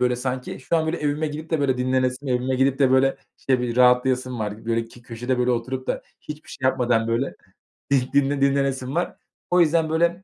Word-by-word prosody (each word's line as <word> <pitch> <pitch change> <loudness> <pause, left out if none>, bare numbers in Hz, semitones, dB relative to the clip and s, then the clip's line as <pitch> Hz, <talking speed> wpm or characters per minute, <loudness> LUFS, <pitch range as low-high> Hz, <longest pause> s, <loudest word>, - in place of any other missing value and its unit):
böyle, 125 -1 +2
sanki 130 +1 -4
şu 165 - 0
an, 160 -1 0
böyle, 165 +2 -1
evime 150 +1 -1
gidip 155 +2 -7
de, 160 -3 +1
böyle, 130 -2 +1
dinlenesim. 130 +1 0
Evime 125 +1 0
gidip 135 +1 +2
de, 135 -2 +4
böyle, 135 +1 +3 0.2
işte, 130 -2 +1
bir 120 -1 -2
rahatlayasım 125 0 +3
var. 105 0 -5
Böyle, 115 0 0
ki 120 +1 -16
köşede, 120 +2 -3
böyle, 125 0 +2
oturup 130 +2 -2
da - - -2 0.2
hiçbir 150 0 -9
şey 130 0 -1
yapmadan, 120 -3 +1
böyle, 120 +4 -1 0.8
dinle 140 0 +2
dinlenesim 135 0 +1
var. 175 - -1 0.3
O 180 0 +5
yüzden, 160 0 +2
böyle, 170 +3 +1
130 Hz, 200 wpm, -23 LUFS, 125-145 Hz, 0.8 s, O